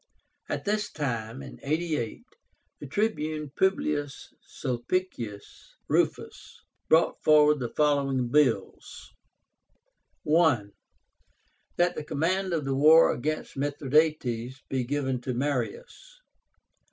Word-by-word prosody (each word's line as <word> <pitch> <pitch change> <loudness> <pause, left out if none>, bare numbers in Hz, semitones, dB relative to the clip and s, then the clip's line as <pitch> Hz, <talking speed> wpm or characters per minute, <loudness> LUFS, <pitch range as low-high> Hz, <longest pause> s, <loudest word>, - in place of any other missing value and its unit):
At - - -3
this 210 0 -1
time 120 -3 -4 0.2
(88) 150 -6 -2 0.6
the 145 - -8
TRIBUNE 155 -6 -2
PUBLIUS 150 -7 -1
SULPICIUS 120 - -5
RUFUS - - -2 0.3
brought 165 +1 +3
forward 150 -1 +5
the 120 -2 -3
following 140 -4 +1
bills: 125 -8 0 1.1
1. 150 -10 +2 1.1
That 175 0 +3
the 155 - -5
command 185 +6 -1
of 160 -4 -1
the 135 0 -1
war 155 +4 +6
against 155 +5 -4
Mithradátes 140 -3 0
be 130 -2 -1
given 135 -1 -2
to 125 0 -3
Marius. 470 - -4
145 Hz, 95 wpm, -27 LUFS, 130-160 Hz, 1.1 s, war